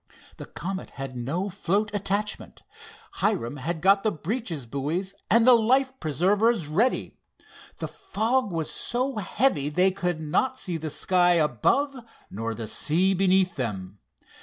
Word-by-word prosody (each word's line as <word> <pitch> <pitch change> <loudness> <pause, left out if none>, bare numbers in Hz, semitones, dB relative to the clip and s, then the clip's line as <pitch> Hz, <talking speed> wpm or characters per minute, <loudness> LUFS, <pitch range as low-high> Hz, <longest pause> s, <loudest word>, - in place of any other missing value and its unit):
The - - -9
Comet 190 +3 -5
had 135 -2 -6
no 145 +11 -2
float 200 +2 -1
attachment. 205 +1 -2 0.5
Hiram 120 +5 -1 0.2
got 195 +2 +5
the 215 - +1
breeches 170 - -4
buoys 150 +10 -3 0.2
and 230 +1 +5
the 255 - +8
life 260 +4 +3
preservers 195 - +2
ready. 195 - 0 0.6
The - - -4
fog 225 +1 -1
was 165 -3 -2
so 255 +1 -1
heavy 195 - +1
they 180 +5 +3
could 180 -3 -2
not 205 +12 0
see 175 -3 -3
the 155 0 -4
sky 175 +3 +3
above 170 - +2 0.4
nor 115 +2 -4
the 115 +1 -5
sea 175 - +1
beneath 185 -1 +2
them. 100 -6 -4
185 Hz, 135 wpm, -26 LUFS, 150-210 Hz, 0.6 s, the